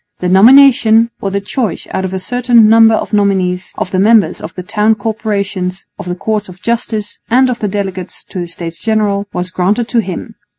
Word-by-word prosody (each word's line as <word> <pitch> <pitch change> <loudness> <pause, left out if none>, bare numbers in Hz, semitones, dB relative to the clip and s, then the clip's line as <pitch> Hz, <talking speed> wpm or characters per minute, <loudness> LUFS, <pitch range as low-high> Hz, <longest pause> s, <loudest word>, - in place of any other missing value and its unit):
The 180 - -2
nomination, 230 +2 +5
or 195 - -2
the 200 +1 -2
choice 210 +3 -3
out 190 - -2
of 185 - -4
a 190 - -3
certain 240 +2 +3
number 225 0 +5
of - - -4
nominees, 190 -3 0
of 185 - -4
the 185 - 0
members 215 +1 +3
of - - -8
the 180 - -6
Town 210 +3 +1
Corporations, 200 -4 -3
of - - -7
the 180 - -2
Courts 210 +1 -3
of 180 +1 -13
Justice 225 -2 -3
and 255 +2 +3
of 235 - -4
the 210 - -2
delegates 190 -2 -5
to 185 - -7
the 175 - -4
States 170 0 -6
General, 210 -2 -1
was 180 +1 -4
granted 205 +6 0
to 240 - +1
him. 215 +2 -6
205 Hz, 205 wpm, -13 LUFS, 185-225 Hz, -, nomination